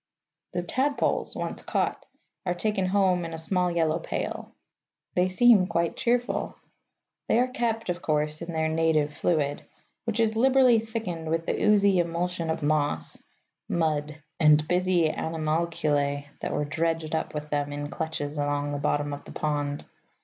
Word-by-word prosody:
The 175 0 -1
tadpoles, 270 +10 0
once - - -4
caught, - - -2 0.4
are 180 -2 -1
taken 195 0 0
home 185 -2 +2
in 165 -1 -5
a - - -6
small 180 +2 +1
yellow 165 -1 +1
pail. - - -4 0.6
They 180 +1 +2
seem 205 -1 +5
quite 170 -1 0
cheerful. 245 +1 0 0.7
They - - +3
are 250 +1 +3
kept, 235 -3 -2
of 175 -1 -2
course, 150 0 0
in 170 0 -5
their 160 -1 0
native 160 -2 +1
fluid, 145 -2 0 0.4
which 230 -1 -2
is 220 -1 +2
liberally 255 0 +5
thickened 215 -8 -4
with 165 +1 0
the - - -1
oozy 200 -3 +4
emulsion 170 0 -1
of 160 -1 -2
moss, 145 - 0 0.5
mud, 155 -2 -1 0.2
and 150 -1 +5
busy 180 -2 +2
animalculæ 155 -3 -1
that - - -3
were 150 - -1
dredged 160 +1 -1
up 160 -1 -2
with 150 0 -5
them 145 -1 0
in 145 0 -4
clutches 145 -1 -4
along 145 0 -1
the 145 - -2
bottom 145 0 0
of 145 - -8
the - - -10
pond. 145 -1 -2
165 Hz, 155 wpm, -27 LUFS, 150-185 Hz, 0.7 s, seem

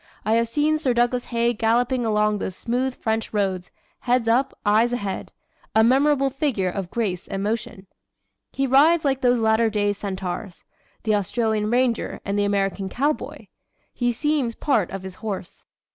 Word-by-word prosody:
I 215 - +2
have 230 +1 +2
seen 300 +5 +1
Sir 260 -6 0
Douglas 240 +1 +1
Haig 235 -1 0
galloping 240 +2 +1
along 210 -1 +1
those 185 - -4
smooth 250 +4 -2
French 220 -1 -2
roads, 190 -3 -1 0.3
head 245 -1 +1
up, 255 +4 +2
eyes 220 +3 +3
ahead 200 -6 -4 0.4
a 220 - +6
memorable 275 +3 +3
figure 250 -10 -1
of 195 -2 -4
grace 195 -5 -2
and 195 0 -3
motion. 220 -1 -3 0.7
He 275 - -1
rides 300 +5 +4
like 270 -1 +1
those 245 -1 +3
latter 220 0 +3
day 205 -1 0
centaurs 190 -1 -5 0.4
the 220 - +1
Australian 215 +1 0
ranger 245 -1 0
and 200 - -1
the 205 0 +2
American 195 -1 -1
cowboy. 290 +8 -2 0.5
He 245 -1 0
seems 265 -1 -1
part 225 - +1
of 195 -1 -6
his 190 -1 -7
horse." 200 -5 -6
230 Hz, 160 wpm, -23 LUFS, 205-250 Hz, 0.7 s, a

